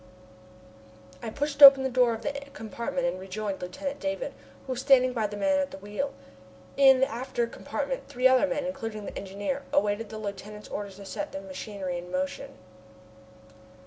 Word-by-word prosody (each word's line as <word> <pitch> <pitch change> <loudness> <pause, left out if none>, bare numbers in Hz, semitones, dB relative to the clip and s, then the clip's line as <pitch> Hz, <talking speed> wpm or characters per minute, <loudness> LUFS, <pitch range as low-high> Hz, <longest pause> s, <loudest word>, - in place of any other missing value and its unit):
I - - -4
pushed 285 +4 -3
open 275 -1 +11
the - - +1
door 250 -2 +3
of 225 - -10
the 290 - -1 0.2
compartment 235 +5 -3
and 260 -8 -1
rejoined 195 +1 -4
Lieutenant 275 +11 -5
Davon, 290 +13 -3 0.3
who 265 - -5
was 250 - -4
standing 260 -2 +5
by 220 -3 0
the 205 0 -7
man 285 +5 +2
at 280 -1 -1
the - - -9
wheel. 210 +8 -4 0.6
In 265 -2 +6
the 265 - +4
after 240 0 -2
compartment - - -4
three 250 +1 +3
other 260 +2 +4
men, 285 -1 -2
including 225 -7 -5
the - - -7
engineer, 205 +8 -3
awaited 205 +2 +1
the 220 - -7
lieutenant's 210 0 -7
orders 200 -2 -5
to 200 0 -11
set 295 +9 -5
the 195 - -4
machinery 190 -1 -5
in 175 +1 -10
motion. 185 0 -3
230 Hz, 175 wpm, -28 LUFS, 200-275 Hz, 0.6 s, open